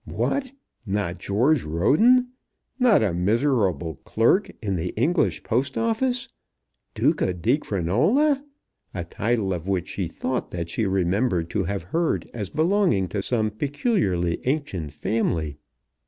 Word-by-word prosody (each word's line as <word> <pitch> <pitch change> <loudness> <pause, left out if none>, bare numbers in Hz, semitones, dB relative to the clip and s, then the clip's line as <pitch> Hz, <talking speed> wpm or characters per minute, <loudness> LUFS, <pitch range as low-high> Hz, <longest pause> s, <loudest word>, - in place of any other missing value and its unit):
What! 270 -2 -1 0.3
not 100 -4 -2
George 120 - +2
Roden! 215 - +3 0.5
Not 240 - +5
a 100 -5 +1
miserable 95 - +1
clerk 120 - +2
in 100 -4 -2
the 85 0 -2
English 160 - +1
Post 130 +4 -1
Office! 240 +2 0 0.7
Duca 90 - +1
di 115 - +1
Crinola; 160 - +1 0.5
a 90 - -2
title 105 +2 -1
of 90 0 -5
which 95 -3 -1
she 95 -4 -3
thought 125 +8 -3
that 85 -1 -5
she 110 +2 0
remembered 95 -1 0
to 95 - 0
have 100 0 -3
heard 165 - -1
as 105 -5 -4
belonging 165 - +2
to 100 - -2
some 110 0 0
peculiarly 110 - 0
ancient 125 - -2
family! 80 -3 -1
110 Hz, 130 wpm, -24 LUFS, -, 0.7 s, Not